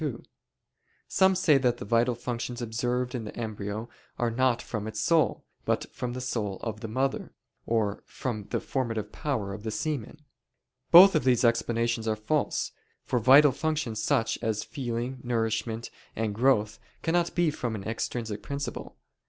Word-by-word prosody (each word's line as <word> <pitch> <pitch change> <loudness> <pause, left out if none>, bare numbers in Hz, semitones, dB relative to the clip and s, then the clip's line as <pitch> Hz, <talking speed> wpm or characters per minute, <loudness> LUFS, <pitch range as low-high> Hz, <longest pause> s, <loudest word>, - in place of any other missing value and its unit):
2: 140 -7 -3 0.8
Some 190 0 +4
say 155 -6 +4
that 125 -2 +1
the - - -7
vital 115 +3 +2
functions 120 +1 -4
observed 125 +2 -1
in 120 -3 -3
the 105 - -8
embryo 110 -1 -4 0.3
are 120 -1 0
not 125 0 +2
from 110 -3 -5
its 105 -1 -5
soul, 160 +7 +2 0.2
but - - 0
from 125 -1 -4
the 130 - -4
soul 110 -6 -2
of 110 -2 -4
the 110 - -5
mother; 130 +5 -2 0.3
or 110 -3 0
from 110 -6 -4
the - - 0
formative 115 -5 -3
power 110 -10 -2
of 100 - -7
the 110 - -4
semen. 130 +5 -3 0.7
Both 185 +3 +10
of - - +2
these 125 -1 +3
explanations 115 0 +1
are 110 - +1
false; 140 +8 -1 0.3
for 125 - +1
vital 135 +5 +7
functions 145 -6 -2
such 115 +1 +1
as 110 -1 -1
feeling, 125 0 -4
nourishment, 115 -1 -1 0.2
and 110 -1 -1
growth 110 -2 +2 0.2
cannot 170 +1 +1
be 175 -3 +3
from 120 -6 -3
an 100 - -6
extrinsic 110 -1 -3
principle. 140 +7 -5
120 Hz, 160 wpm, -28 LUFS, 110-130 Hz, 0.8 s, Both